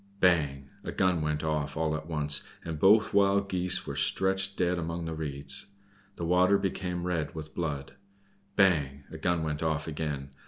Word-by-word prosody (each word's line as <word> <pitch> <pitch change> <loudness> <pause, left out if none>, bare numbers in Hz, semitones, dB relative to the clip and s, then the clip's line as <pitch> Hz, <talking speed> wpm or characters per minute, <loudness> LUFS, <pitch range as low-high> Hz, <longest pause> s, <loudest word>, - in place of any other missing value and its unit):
Bang! 75 -7 +2 0.2
a - - -4
gun 90 -3 +1
went 75 0 -1
off 75 -2 -1
all 80 -1 0
at 80 0 -6
once, 75 -3 +2 0.2
and 80 -2 -4
both 105 +6 +5
Wild 100 0 +3
Geese 90 -1 +1
were 70 - -5
stretched 95 +6 +1
dead 90 -1 +1
among 85 0 -3
the 80 - -3
reeds; 70 -1 -3 0.5
the 85 - -4
water 90 +3 +4
became 90 -2 -3
red 85 -2 -2
with 75 -1 -7
blood. 75 -5 -3 0.6
Bang! 75 -9 +3
a - - -8
gun 85 -2 +1
went 75 -1 -2
off 80 -1 -1
again. 75 -3 -4
80 Hz, 170 wpm, -29 LUFS, 75-90 Hz, 0.6 s, both